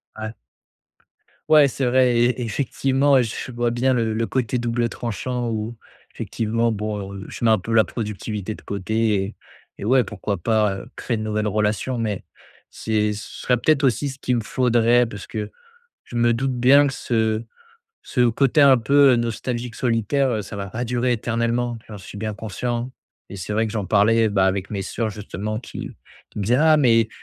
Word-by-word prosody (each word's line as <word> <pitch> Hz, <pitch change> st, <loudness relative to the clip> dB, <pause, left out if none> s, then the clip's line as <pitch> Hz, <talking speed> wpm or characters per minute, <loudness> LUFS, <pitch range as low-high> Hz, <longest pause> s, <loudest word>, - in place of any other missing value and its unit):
Ouais. 110 Hz, 0 st, -6 dB, 1.2 s
Ouais, 150 Hz, -3 st, +7 dB
c'est 135 Hz, 0 st, -2 dB
vrai 125 Hz, 0 st, +4 dB
et 120 Hz, +1 st, +2 dB
effectivement, 135 Hz, +3 st, +2 dB
j 115 Hz, -3 st, -3 dB
je -, -, -8 dB
vois 120 Hz, 0 st, 0 dB
bien 125 Hz, +2 st, +1 dB
le 115 Hz, -3 st, 0 dB
le 115 Hz, +1 st, -1 dB
côté 125 Hz, -2 st, -1 dB
double 120 Hz, 0 st, -1 dB
tranchant 120 Hz, +3 st, -3 dB
où, 110 Hz, +1 st, -4 dB, 0.4 s
effectivement, 115 Hz, +1 st, -1 dB
bon, 105 Hz, -2 st, -4 dB
heu, 100 Hz, 0 st, -7 dB
je -, -, -4 dB
mets 110 Hz, -, +5 dB
un 110 Hz, -, +5 dB
peu 100 Hz, +4 st, -6 dB
la 110 Hz, -1 st, +5 dB
productivité 105 Hz, -1 st, -4 dB
de -, -, -13 dB
côté 110 Hz, +3 st, -1 dB
et 100 Hz, -, -7 dB, 0.4 s
et -, -, -6 dB
ouais, 130 Hz, +2 st, +4 dB
pourquoi 105 Hz, -2 st, -4 dB
pas, 105 Hz, +2 st, +1 dB
heu, 95 Hz, -, -8 dB
créer 120 Hz, -, -2 dB
de 110 Hz, -, -4 dB
nouvelles 110 Hz, 0 st, -1 dB
relations 105 Hz, +4 st, 0 dB
mais 105 Hz, -4 st, -3 dB, 0.4 s
c'est 105 Hz, -1 st, -1 dB
ce 105 Hz, +1 st, -9 dB
serait 125 Hz, -, +3 dB
peut-être 140 Hz, +3 st, +2 dB
aussi 135 Hz, +3 st, +1 dB
ce 135 Hz, +1 st, -9 dB
qui 125 Hz, -, -1 dB
me 115 Hz, -, 0 dB
faudrait 120 Hz, 0 st, +3 dB
parce 105 Hz, -4 st, -8 dB
que 110 Hz, -3 st, -5 dB, 0.6 s
je 120 Hz, -, -8 dB
me 120 Hz, 0 st, +3 dB
doute 125 Hz, +2 st, -1 dB
bien 140 Hz, +4 st, +6 dB
que 135 Hz, -, -2 dB
ce 110 Hz, -2 st, 0 dB, 0.6 s
ce 130 Hz, -, -2 dB
côté 135 Hz, +5 st, +2 dB
un 135 Hz, -2 st, +7 dB
peu, 140 Hz, +4 st, +5 dB
heu, -, -, +2 dB
nostalgique 120 Hz, +1 st, -3 dB
solitaire, 125 Hz, +3 st, +1 dB
heu, 110 Hz, -3 st, -1 dB
ça 100 Hz, -, -9 dB
va 100 Hz, -1 st, -5 dB
pas 120 Hz, +5 st, -3 dB
durer 125 Hz, +1 st, 0 dB
éternellement, 120 Hz, +1 st, -1 dB
j'en 105 Hz, -2 st, -8 dB
suis 100 Hz, -, -11 dB
bien 110 Hz, +1 st, -3 dB
conscient 120 Hz, +4 st, -4 dB, 0.4 s
et -, -, -7 dB
c'est 95 Hz, +3 st, -5 dB
vrai 110 Hz, +2 st, +1 dB
que 105 Hz, -, -6 dB
j'en 105 Hz, -3 st, -2 dB
parlais, 110 Hz, +3 st, +3 dB
bah, 100 Hz, -2 st, +2 dB
avec 95 Hz, 0 st, -1 dB
mes 100 Hz, -2 st, -3 dB
sœurs, 110 Hz, +3 st, -3 dB
justement, 105 Hz, +1 st, -5 dB
qui 120 Hz, -, -7 dB, 0.4 s
qui -, -, -9 dB
me 100 Hz, -, -1 dB
disaient: 115 Hz, +5 st, +2 dB
«Ah! 155 Hz, -1 st, +6 dB
Mais 115 Hz, -6 st, +4 dB
115 Hz, 195 wpm, -22 LUFS, 105-125 Hz, 1.2 s, Ouais